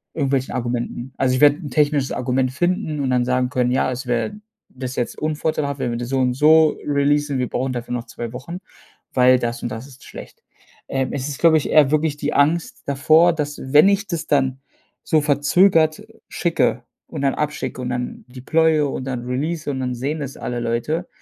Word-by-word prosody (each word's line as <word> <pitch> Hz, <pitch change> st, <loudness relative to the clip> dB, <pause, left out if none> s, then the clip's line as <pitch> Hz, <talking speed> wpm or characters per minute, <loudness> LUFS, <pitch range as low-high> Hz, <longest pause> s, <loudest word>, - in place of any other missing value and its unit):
irgendwelchen 135 Hz, -3 st, 0 dB
Argumenten. 120 Hz, +1 st, -4 dB
Also, 130 Hz, -1 st, +1 dB
ich 130 Hz, -, -1 dB
werde 145 Hz, 0 st, +6 dB
'n 155 Hz, -4 st, -8 dB
technisches 145 Hz, -1 st, +1 dB
Argument 130 Hz, +1 st, 0 dB
finden 160 Hz, 0 st, -1 dB
und 130 Hz, -2 st, -1 dB
dann 125 Hz, -1 st, +2 dB
sagen 125 Hz, 0 st, 0 dB
können: 125 Hz, -1 st, 0 dB
„Ja, 130 Hz, 0 st, +1 dB
es 130 Hz, +1 st, -6 dB
wär 120 Hz, -2 st, -1 dB, 0.4 s
das 130 Hz, 0 st, -6 dB
wäre -, -, +2 dB
jetzt -, -, -13 dB
unvorteilhaft, 150 Hz, -2 st, -2 dB
wenn 125 Hz, -, -1 dB
wir 120 Hz, -, -3 dB
das 120 Hz, 0 st, -5 dB
so 135 Hz, 0 st, 0 dB
und 125 Hz, -1 st, +1 dB
so 155 Hz, +3 st, +5 dB
releasen, 145 Hz, -1 st, +1 dB
wir 125 Hz, -, -1 dB
brauchen 130 Hz, +1 st, -2 dB
dafür 120 Hz, 0 st, -6 dB
noch 120 Hz, -1 st, -3 dB
2 120 Hz, -1 st, -7 dB
Wochen, 165 Hz, +8 st, -7 dB, 0.5 s
weil 125 Hz, 0 st, +4 dB
das 120 Hz, -1 st, -3 dB
und 120 Hz, -, -2 dB
das 115 Hz, +4 st, -7 dB
ist 135 Hz, -2 st, -16 dB
schlecht.“ -, -, -12 dB, 0.4 s
Ähm, 135 Hz, -1 st, -1 dB
es 140 Hz, -1 st, -3 dB
ist, 145 Hz, -2 st, -6 dB
glaube 165 Hz, -2 st, +5 dB
ich, 150 Hz, -, -2 dB
eher 150 Hz, -3 st, +5 dB
wirklich 155 Hz, 0 st, 0 dB
die 150 Hz, 0 st, -2 dB
Angst 160 Hz, +4 st, +1 dB
davor, 155 Hz, +5 st, +4 dB
dass, 145 Hz, -2 st, -4 dB
wenn 145 Hz, +7 st, +5 dB
ich 200 Hz, +2 st, +1 dB
das 170 Hz, -5 st, -4 dB
dann 135 Hz, -2 st, +1 dB, 0.4 s
so 155 Hz, -, +2 dB
verzögert 155 Hz, +3 st, +3 dB, 0.2 s
schicke -, -, 0 dB, 0.2 s
und -, -, -6 dB
dann 135 Hz, -, +2 dB
abschicke 145 Hz, -4 st, -3 dB
und 125 Hz, -, -3 dB
dann 125 Hz, 0 st, -4 dB
deploye 155 Hz, +5 st, +1 dB
und 130 Hz, -1 st, -5 dB
dann 125 Hz, -2 st, -4 dB
release 150 Hz, +6 st, -3 dB
und 135 Hz, -, -4 dB
dann 125 Hz, -1 st, -2 dB
sehen 145 Hz, +6 st, -3 dB
es 135 Hz, -1 st, -6 dB
alle 120 Hz, 0 st, -4 dB
Leute 120 Hz, +9 st, -2 dB
135 Hz, 205 wpm, -21 LUFS, 125-150 Hz, 0.5 s, werde